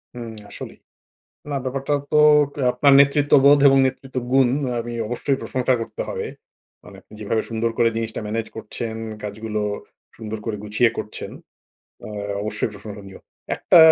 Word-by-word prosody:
হুম, 115 -2 -6 0.2
আসলেই। - - -8 0.7
না 140 - -1
ব্যাপারটা 135 +2 -2 0.2
তো - - +2 0.4
কে 145 - -7
আপনার 140 +2 +4
নেতৃত্ববোধ 140 0 +5
এবং 135 - +5
নেতৃত্ব 130 0 -6 0.2
গুণ 135 -2 +5 0.2
আ - - -2
আমি 120 +1 -6
অবশ্যই 125 +4 -1
প্রশংসা 130 0 0
করতে 115 - -5
হবে। - - -3 0.6
মানে - - -13 0.2
যেভাবে 110 +1 -1
সুন্দর 115 +1 0
করে 120 -1 +5
জিনিসটা 115 -1 -3
ম্যানেজ 110 +1 -2
করছেন 110 +1 -5 0.3
কাজগুলো, 105 +1 -4 0.5
সুন্দর 110 -1 -6
করে 110 -2 -2
গুছিয়ে 110 +3 +2
করছেন। - - -5 0.8
আ - - -7 0.3
অবশ্যই 110 +1 -2
প্রশংসনীয়। 100 -1 -10 0.4
একটা - - +5
115 Hz, 140 wpm, -22 LUFS, 110-135 Hz, 0.8 s, নেতৃত্ববোধ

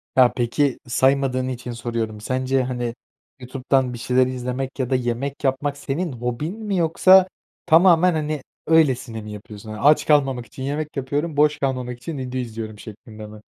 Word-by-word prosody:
Ya, 125 -2 +5
peki, 125 +3 0
saymadığın 130 0 +1
için 125 -1 -5
soruyorum. 115 -2 -4
Sence, 130 +2 0
hani, 120 -2 -3 0.4
YouTube'dan 130 0 -1
bir - - -6
şeyler 125 +2 +2
izlemek 130 +1 -4
ya 130 -2 -1
da 130 - +2
yemek 125 +4 -3
yapmak 140 +2 0
senin 145 +4 -3
hobin 125 - -4
mi 205 -3 -1
yoksa 185 +3 +5 0.4
tamamen, 175 +1 +5
hani, 155 -2 -2 0.3
öylesine 130 -8 +2
mi 105 0 -9
yapıyorsun? 105 +1 -10
Hani, 110 - -6
aç 150 +2 +5
kalmamak 135 -5 +2
için 130 - -9
yemek 150 +2 -4
yapıyorum, 145 +3 -2
boş 150 0 +4
kalmamak 125 -3 -2
için 155 +4 -6
video 130 -1 -4
izliyorum 110 -3 -6
şeklinde 110 0 -11
mi? 105 0 -12
130 Hz, 165 wpm, -22 LUFS, 120-145 Hz, 0.4 s, Ya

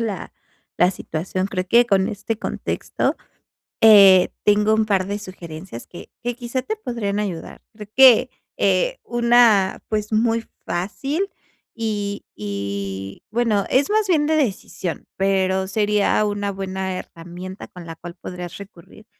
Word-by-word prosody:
la 200 - -6 0.5
la 180 - +5
situación. 185 +1 -3
Creo 185 -2 -3
que 235 +2 +5
con 195 -4 +2
este 210 +2 -4
contexto, - - -2 0.7
eh, 195 -4 +8
tengo 210 +1 +4
un 220 0 +2
par 195 -3 +1
de 205 +1 -3
sugerencias 175 - -9
que 175 - -11
que 245 0 -2
quizá 245 +1 -3
te 435 - -3
podrían 235 - -3
ayudar. 190 -6 -5
Creo 210 -2 -10
que, 260 -1 +7 0.3
eh, - - +1
una, 235 -5 +4
pues, 210 0 -2
muy 225 +1 +1 0.2
fácil 270 - -2 0.4
y 205 -3 -3
y 100 -1 -5
bueno, 220 -4 +1
es 270 +2 +2
más 430 0 +2
bien 315 -5 +3
de 315 - +2
decisión, 200 - -2
pero 190 -1 +1
sería 210 +1 +2
una 205 -1 -2
buena 190 -1 -4
herramienta 175 +3 -9
con 180 -1 -12
la 165 - -7
cual 175 +1 -10
podrías 180 -1 -7
recurrir. 200 +1 -14
200 Hz, 140 wpm, -21 LUFS, 185-230 Hz, 0.7 s, eh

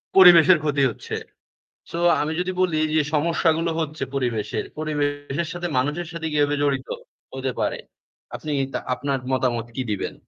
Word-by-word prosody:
পরিবেশের 180 -2 +9
ক্ষতি 145 -2 +1
হচ্ছে। - - -7 0.8
সো 170 - -4 0.2
আমি 150 +2 -1
যদি 180 +1 -1
বলি 175 -4 +2 0.2
যে 155 - +5
সমস্যাগুলো 165 +1 +2
হচ্ছে 155 0 -3
পরিবেশের। 120 -6 -1
পরিবেশের 145 +1 -2
সাথে 175 0 -3
মানুষের 150 +7 -1
সাথে 165 -1 -5
কিভাবে 145 0 +2
জড়িত, 135 -2 0 0.5
হতে 130 0 -2
পারে? - - 0 0.6
আপনি 155 - -5 0.2
তা - - -1
আপনার 140 +1 -2
মতামত 120 -3 0
কি 130 - -1
দিবেন? 100 - -3
150 Hz, 145 wpm, -23 LUFS, 135-165 Hz, 0.8 s, পরিবেশের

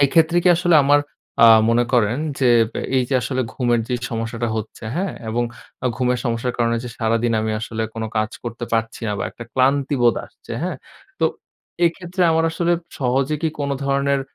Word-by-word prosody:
এক্ষেত্রে 165 +4 +3
কি - - +6
আসলে 175 -2 +3
আমার 145 +1 +5 0.4
আ - - +9 0.2
মনে 120 +1 +3
করেন 120 +1 +2 0.2
যে, 130 - +4 0.5
এই 125 - +3
যে 135 - -1
আসলে 130 +2 -1
ঘুমের 120 -2 +1
যে 125 - 0 0.2
সমস্যাটা 115 +1 -2
হচ্ছে, 110 +1 -6
হ্যাঁ? 190 +1 -1 0.2
এবং 120 +2 0 0.5
ঘুমের 125 -1 +1
সমস্যার 120 +1 -1
কারণে 115 0 +2
যে - - -5
সারাদিন 115 +1 +1
আমি 110 0 -1
আসলে 110 0 -4
কোন 115 - -4 0.2
কাজ 110 0 0
করতে 120 +1 -5
পারছি 115 0 -1
না, - - 0
বা - - -2
একটা 120 - -10
ক্লান্তি 135 +2 +2
বোধ 120 -1 +4
আসছে, - - -12
হ্যাঁ? - - -2 0.4
তো - - +3 0.6
এক্ষেত্রে 180 +2 -2
আমার 160 0 +2
আসলে 170 +1 +1 0.3
সহজে 135 +3 +1
কি 160 - +2
কোন 140 0 -1
ধরনের, 140 0 +1
125 Hz, 180 wpm, -21 LUFS, 115-140 Hz, 0.6 s, আ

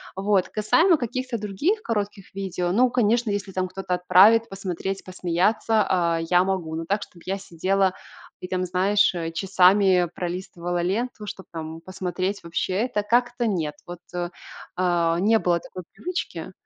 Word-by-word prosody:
Вот. 195 -1 +1
Касаемо 325 - +3
каких-то 255 0 -3
других 225 - -1
коротких 205 -3 -3
видео, 180 -2 -2
ну, 245 +6 +4
конечно, 235 -1 +2
если 200 -1 -3
там 185 0 -1
кто-то 190 0 -4
отправит 190 +6 +5
посмотреть, 195 0 -4
посмеяться, 190 +5 +1
а, 170 -3 +1
я 180 0 +5
могу, 185 -4 -2
но 165 +1 -4
так, 200 +4 0
чтобы 170 -4 -16
я 195 +1 -2
сидела 190 +1 0 0.5
и 180 - -7
там, 185 0 -1
знаешь, 190 +3 +2
э, 165 -2 -3
часами 185 0 +4
пролистывала 175 -1 -3
ленту, 210 +4 -2
чтоб 190 - -7
там 160 0 -6
посмотреть, 185 +2 -3
вообще, 170 +2 -2
это 210 -5 -2
как-то 240 +2 +1
нет. 165 -9 -1
Вот, 175 -1 -8 0.8
а, 170 -2 +1
не 220 +4 +4
было 175 -3 +1
такой 185 +2 -9
привычки. 360 +1 -5
190 Hz, 150 wpm, -24 LUFS, 180-210 Hz, 0.8 s, отправит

